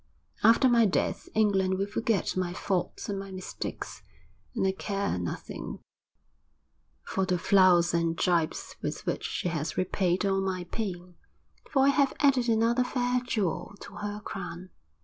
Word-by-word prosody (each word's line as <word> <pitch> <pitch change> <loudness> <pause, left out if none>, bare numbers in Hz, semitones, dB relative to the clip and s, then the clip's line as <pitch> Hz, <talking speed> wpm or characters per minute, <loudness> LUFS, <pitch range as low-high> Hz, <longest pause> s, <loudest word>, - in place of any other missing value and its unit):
After 230 +5 +6
my 235 -3 +5
death 190 - -1
England 190 -3 +2
will 195 - 0
forget 205 0 0
my 180 -1 -1
faults 185 0 -2
and 200 -1 -2
my 195 0 -7
mistakes; 185 -1 -6 0.5
and 225 - +1
I 190 - +3
care 195 - -2
nothing 85 -1 -5 1.3
for 190 - -1
the 180 -1 +1
flouts 180 -2 +5
and 165 -1 +1
gibes 170 -3 0
with - - -4
which - - -2
she 180 - -2
has 160 -2 -3
repaid 185 0 +1
all 195 -1 +2
my 185 -2 -2
pain, 180 -2 -5 0.5
for 270 -1 +3
I - - +6
have 280 -1 +2
added 265 -4 +3
another 230 +2 +3
fair 250 0 0
jewel 205 -5 -2
to - - -10
her 205 0 -4
crown. 185 -3 -7
195 Hz, 150 wpm, -28 LUFS, 180-225 Hz, 1.3 s, After